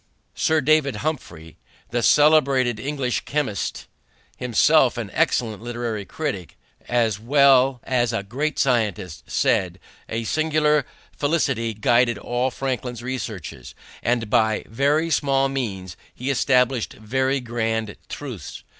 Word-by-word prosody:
Sir 160 -1 +1
Humphry 140 - 0
Davy, 80 0 -15 0.3
the 120 +1 0
celebrated 140 -4 +4
English 135 -1 -2
chemist, 140 -9 -3 0.5
himself 125 +2 +3
an 110 -4 -5
excellent 120 -10 0
literary 120 -3 -4
critic 135 - -5 0.3
as 115 -4 +1
well 135 +1 +4
as 120 -3 +1
a 115 -3 -2
great 140 +9 -3
scientist, 105 - -1
said: - - +1 0.3
"A 115 +1 -2
singular 150 +2 +1 0.3
felicity 135 -7 0
guided 120 +1 +2
all 120 +5 -1
Franklin's 125 -2 -4
researches, 120 - -6 0.3
and 120 -1 0
by 110 +1 +2
very 145 +8 +1
small 135 -1 +2
means 100 -10 -4 0.2
he 130 +3 -2
established 125 -2 +2
very 130 +5 -1
grand 110 -3 -2
truths. 125 - -7
125 Hz, 115 wpm, -23 LUFS, 110-140 Hz, 0.5 s, celebrated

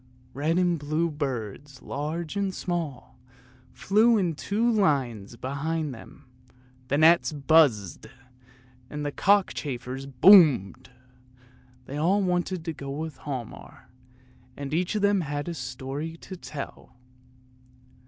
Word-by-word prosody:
Red 155 +5 0
and 175 -2 +2
blue 155 +3 -1
birds, 135 -1 -5
large 155 +5 -4
and 200 -1 0
small, 150 -7 -5 0.5
flew 220 +4 +3
in 180 -5 0
two 205 +9 -2
long 235 -2 +2
lines 125 - 0
behind 145 +4 -3
them; 130 +4 -14 0.6
the 140 - 0
gnats 165 +2 +5
buzzed, 140 - +2 0.8
and 150 0 -5
the 145 - -2
cockchafers 135 -9 0
boomed; 140 - +5 1.0
they 140 - -6
all 190 +7 +2
wanted 180 -1 -1
to 165 - -3
go 140 -2 -8
with 150 0 -5
Hialmar, 130 -6 -8 0.7
and 140 0 -5
each 175 +5 0
of 210 - -1
them 200 -1 +3
had 145 -1 -4
a 170 - -3
story 135 +4 -6
to 185 - -9
tell. 150 -7 -9
150 Hz, 125 wpm, -26 LUFS, 135-175 Hz, 1.0 s, gnats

